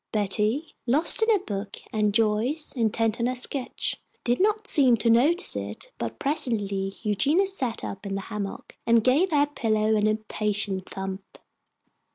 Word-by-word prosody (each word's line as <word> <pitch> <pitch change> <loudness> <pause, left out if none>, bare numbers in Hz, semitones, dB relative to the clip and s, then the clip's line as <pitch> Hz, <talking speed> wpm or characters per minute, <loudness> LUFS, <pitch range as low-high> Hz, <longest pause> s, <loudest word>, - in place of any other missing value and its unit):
Betty, 215 +8 0
lost 295 - +4
in 445 - +3
her 435 - +5
book, 195 0 -5 0.2
and 210 -1 +2
Joyce, 225 +8 0
intent 225 -1 0
on 235 - +1
her 255 - -1
sketch, 255 +1 -3 0.2
did 240 0 +1
not 430 +2 +1
seem 260 - +4
to 230 +1 +2
notice 295 +10 +4
it, - - -6
but - - -4
presently 205 -9 -1
Eugenia 280 - +2
sat 270 -12 -3
up 195 - -6
in 195 - -3
the 195 - -3
hammock 200 -1 -6
and 230 -1 +4
gave 285 +10 +3
her 290 -3 +3
pillow 220 -6 0
an 210 0 +2
impatient 210 -3 -1
thump. 190 0 -7
225 Hz, 160 wpm, -25 LUFS, 210-285 Hz, 0.2 s, her